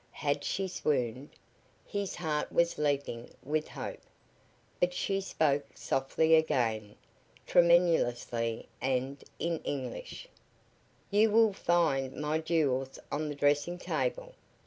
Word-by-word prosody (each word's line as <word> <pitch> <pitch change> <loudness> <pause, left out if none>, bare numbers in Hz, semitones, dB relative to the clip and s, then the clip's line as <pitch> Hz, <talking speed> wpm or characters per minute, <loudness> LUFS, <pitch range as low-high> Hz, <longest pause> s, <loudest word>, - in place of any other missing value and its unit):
Had 145 -1 0
she 195 0 -1
swooned? 135 -6 -1 0.6
His 200 -2 -3
heart 155 -4 -2
was 170 0 +2
leaping 140 -5 -1
with 155 +2 -1
hope. - - -6 0.8
But 175 0 +1
she 195 +1 0
spoke 145 -6 +1
softly 145 +4 +1
again, 115 -9 +2 0.5
tremulously, 120 -10 +3
and 130 +2 -1
in 165 -1 -1
English: 145 - -5 0.8
"You 210 +2 +5
will 220 -1 +5
find 160 -8 +1
my 150 +1 -1
jewels 140 -5 0
on 150 +1 -1
the 145 - -4
dressing 145 +4 +1
table. - - -2
150 Hz, 110 wpm, -31 LUFS, 135-175 Hz, 0.8 s, You